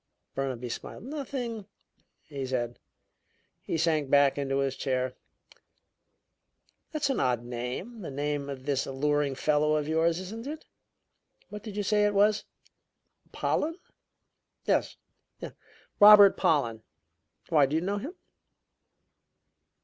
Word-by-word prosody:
Burnaby 130 -3 -3
smiled. 150 - -7
"Nothing," 250 -6 -5 0.6
he 140 -3 -6
said. 120 -2 -3 0.8
He - - -3
sank 155 -3 +1
back 140 -1 +5
into 135 -1 -1
his 135 -1 0
chair. 130 -1 -1 1.8
"That's 295 -3 0
an 265 - -1
odd 125 -2 +1
name 125 - -5
the 170 - -6
name 145 0 -3
of 135 -1 -7
this 140 -2 0
alluring 145 +1 0
fellow 150 +2 +2
of 150 -1 -1
yours, 165 +1 +2
isn't 220 +7 -7
it? 310 +2 -7 0.8
What 210 0 -7
did 210 -2 -8
you 205 - 0
say 210 +1 +2
it 205 0 +1
was 210 +1 +3 0.9
Pollen?" 325 +3 -1 0.9
"Yes. - - 0 1.0
Robert 205 -1 +9
Pollen. 120 -8 +1 0.7
Why, 150 -4 +4
do 145 - -2
you 160 - +1
know 200 +2 -1
him?" 295 - -7
150 Hz, 120 wpm, -28 LUFS, 135-210 Hz, 1.8 s, Robert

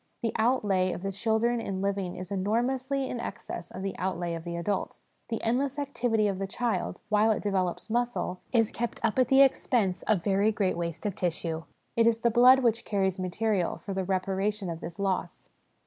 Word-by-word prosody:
The 230 - 0
outlay 205 -6 +2
of 175 - -7
the 195 - -1
children 230 +3 +1
in 195 -4 -3
living 195 -2 -1
is 185 +1 -7
enormously 255 +7 0
in 245 - -4
excess 175 -6 -6
of 185 - -7
the 195 - -3
outlay 175 -2 -2
of 165 -1 -5
the 170 0 -5
adult. 180 +4 -2 0.3
The 225 - -3
endless 265 +4 0
activity 245 -6 +1
of 195 -2 -2
the 195 - -2
child, 235 +3 -2
while 210 +1 +4
it 220 - +1
develops 190 -4 -1
muscle, 235 -5 -1
is 225 -4 +3
kept 240 0 -3
up 225 +3 +1
at 255 - +4
the 270 +2 +7
expense 220 -8 +1
of 205 -6 +2
very 200 +2 +3
great 200 -3 0
waste 170 0 -4
of 205 - 0
tissue. 165 -2 -2 0.3
It 230 0 +4
is 230 0 +2
the 235 - +3
blood 250 +3 +7
which 230 -1 +2
carries 190 -2 0
material 185 0 0
for 200 - -6
the 190 0 -1
reparation 195 +1 -1
of 165 - -5
this 165 0 -7
loss. 190 -3 -2
205 Hz, 195 wpm, -28 LUFS, 185-235 Hz, 0.3 s, the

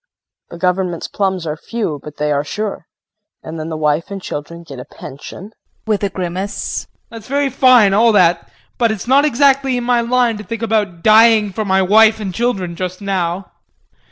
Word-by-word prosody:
The 170 - -9
government's 180 -1 -1
plums 190 -3 -2
are 155 -1 -3
few, 170 -4 -4
but 150 -1 -10
they 150 0 -1
are 145 0 0
sure. 205 +2 -5 0.6
And 160 0 -7
then 155 +1 -5
the 160 - -4
wife 150 +3 0
and 200 -1 -5
children 170 -1 -7
get 140 -6 -10
a - - -6
pension 150 +7 -10
JEAN - - -32 0.3
[With 210 -2 -1
a 200 - +1
grimace]. 185 +2 -4 0.2
That's 225 -2 -10
all 280 - -1
very 285 -1 +1
fine 240 -6 +5
all 225 +3 +4
that, 175 -4 +3 0.3
but 230 -2 +3
it's 215 -4 -5
not 275 +3 +4
exactly 275 -1 +2
in 245 - -3
my 240 0 +2
line 240 -1 +1
to - - -7
think 230 +3 -6
about 205 -7 -1
dying 220 -2 +5
for 215 +2 -3
my 190 -1 +2
wife 220 +3 +5
and 195 -4 -5
children 195 -6 -2
just 185 +1 -5
now. 190 -2 -3
195 Hz, 195 wpm, -17 LUFS, 170-230 Hz, 0.6 s, fine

